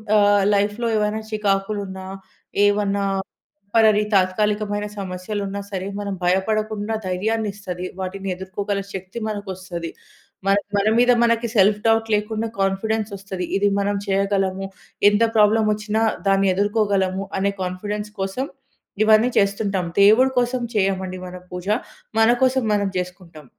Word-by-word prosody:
ఆహ్, 205 -1 +5
లైఫ్‌లో 205 +4 0
ఏవైనా 210 +1 0
చికాకులున్నా, 195 -2 -2 0.6
ఏవన్నా 200 -1 +1 0.7
టెంపరరీ 215 -2 +5
తాత్కాలికమైన 205 +2 +1
సమస్యలు 190 +2 -4
ఉన్నా 200 +1 -4
సరే 190 -2 -4
మనం 200 -1 -3
భయపడకుండా 215 +3 0
ధైర్యాన్ని 210 +4 -1
ఇస్తది. 185 -3 -6
వాటిని 195 +1 -5
ఎదుర్కోగల 200 +2 -3
శక్తి 190 +3 -7
మనకు 205 -2 -4
వస్తది. 175 -2 -6 0.6
మన 195 - +5 0.2
మన 200 +1 +2
మీద 245 +1 +5
మనకి 230 0 +2
సెల్ఫ్ 205 +1 +4
డౌట్ 225 0 +2
లేకుండా 220 +2 -2
కాన్ఫిడెన్స్ 215 +3 0
వస్తది. 190 -2 -5
ఇది 205 +1 +3
మనం 200 0 0
చేయగలము. 195 -1 0 0.4
ఎంత 205 +2 +2
ప్రాబ్లమ్ 215 +1 +4
వచ్చినా 215 +1 -1 0.2
దాన్ని 195 0 +3 0.2
ఎదుర్కోగలము 200 -3 0
అనే 200 +1 +1
కాన్ఫిడెన్స్ 205 +3 -4
కోసం 195 +8 -2 0.6
ఇవన్నీ 220 +3 +5
చేస్తుంటాం. 200 -2 0 0.2
దేవుడు 225 +6 +6
కోసం 245 0 0
చేయమండి 190 -2 0
మనం 180 0 -9
పూజ 180 +1 -6 0.5
మన 225 +1 +5
కోసం 260 0 +3
మనం 205 -1 +1
జేసుకుంటాం. 180 -4 -7
200 Hz, 125 wpm, -22 LUFS, 190-215 Hz, 0.7 s, దేవుడు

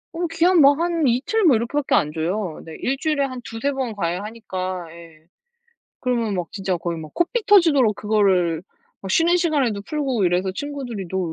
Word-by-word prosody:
어 345 +1 -1
기한 335 +1 +4
뭐 280 +1 +7
한 335 -2 0
2 245 +2 +1
틀 445 -1 +1
뭐 310 -9 +6
이렇게밖에 250 +6 0
안 150 - +2
줘요. 170 +2 -3
네. 160 -1 -9
1 270 +2 -1
주일에 300 -3 0
한 255 -2 -6
2-3 230 +5 -3
번 260 -4 -3
과외하니까. 185 -1 -4
예. 165 -2 -15 0.7
그러면 235 -4 -1
막 180 -3 -2
진짜 190 -3 -2
거의 170 -1 -4
막 155 -1 -9
코피 430 +6 0
터지도록 300 - +5
그거를 190 -6 +1 0.4
막 190 -1 -4
쉬는 340 +5 +3
시간에도 280 - 0
풀고 265 -7 -1
이래서 180 +2 +1
친구들이 250 -4 -5
너 190 - -2
230 Hz, 330 characters per minute, -22 LUFS, 185-290 Hz, 0.7 s, 뭐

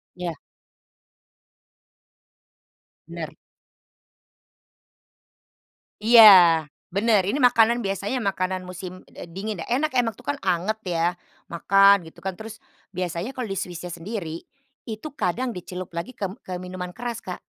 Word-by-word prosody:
Iya. 180 -2 -4 2.7
Benar. - - -7 2.7
Iya, 230 +2 +8 0.7
benar. 205 +3 +3
Ini 260 - 0
makanan 235 -3 +4
biasanya 200 +5 -2
makanan 185 -1 -1
musim, 185 0 -9
eee, 170 - -10
dingin. 195 +2 -5
Enak 280 +5 -1
emang 235 -4 +1
tuh 245 - -17
kan 285 - 0
anget 190 +4 0 0.2
ya, 170 +2 +1 0.3
makan 195 +3 +4
gitu 160 - -20
kan, 190 - -1
terus 220 +3 -9 0.3
biasanya 185 +6 -4
kalau 250 - -2
di 195 - -4
Swiss-nya 180 -2 -5
sendiri, 170 -2 -5 0.5
itu 220 +6 -6
kadang 240 +3 -1
dicelup 180 -1 -8
lagi 170 +9 -6
ke 205 - -2
m 185 - -5
ke 180 -1 -6
minuman 180 0 -6
keras, 235 +3 -6
Kak. - - -7
195 Hz, 125 wpm, -24 LUFS, 180-225 Hz, 2.7 s, Iya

